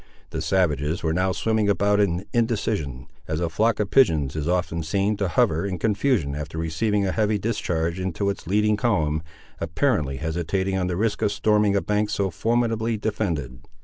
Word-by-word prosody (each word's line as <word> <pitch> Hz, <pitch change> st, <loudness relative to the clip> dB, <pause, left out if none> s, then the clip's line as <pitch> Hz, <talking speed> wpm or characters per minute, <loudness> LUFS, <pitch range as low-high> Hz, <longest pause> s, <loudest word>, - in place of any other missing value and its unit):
The -, -, -3 dB
savages 80 Hz, -4 st, 0 dB
were 80 Hz, -1 st, +1 dB
now 90 Hz, +2 st, +1 dB
swimming 110 Hz, +1 st, +1 dB
about 100 Hz, 0 st, +2 dB
in 95 Hz, -2 st, +1 dB
indecision, 100 Hz, -, -1 dB, 0.2 s
as 80 Hz, 0 st, -2 dB
a 85 Hz, -1 st, -1 dB
flock 110 Hz, +7 st, +1 dB
of 105 Hz, -2 st, -1 dB
pigeons 80 Hz, -, +3 dB
is 75 Hz, 0 st, -2 dB
often 90 Hz, -2 st, 0 dB
seen 100 Hz, +6 st, 0 dB
to 100 Hz, -1 st, 0 dB
hover 80 Hz, -1 st, +2 dB
in 95 Hz, -2 st, -2 dB
confusion 105 Hz, -, +1 dB
after 75 Hz, +2 st, -5 dB
receiving 100 Hz, +6 st, 0 dB
a 95 Hz, -, 0 dB
heavy 105 Hz, 0 st, +1 dB
discharge 90 Hz, -5 st, -1 dB
into 95 Hz, +2 st, -1 dB
its 100 Hz, -, -9 dB
leading 105 Hz, +2 st, +2 dB
column, 80 Hz, -11 st, +1 dB, 0.4 s
apparently 80 Hz, -, 0 dB
hesitating 85 Hz, +5 st, -1 dB
on 95 Hz, -1 st, 0 dB
the 90 Hz, -1 st, -2 dB
risk 105 Hz, 0 st, 0 dB
of 100 Hz, -, +2 dB
storming 105 Hz, 0 st, +2 dB
a 100 Hz, -, +2 dB
bank 105 Hz, 0 st, 0 dB
so 100 Hz, -2 st, -1 dB
formidably 115 Hz, +3 st, 0 dB
defended. 85 Hz, -, -3 dB
95 Hz, 180 wpm, -24 LUFS, 80-105 Hz, 0.4 s, pigeons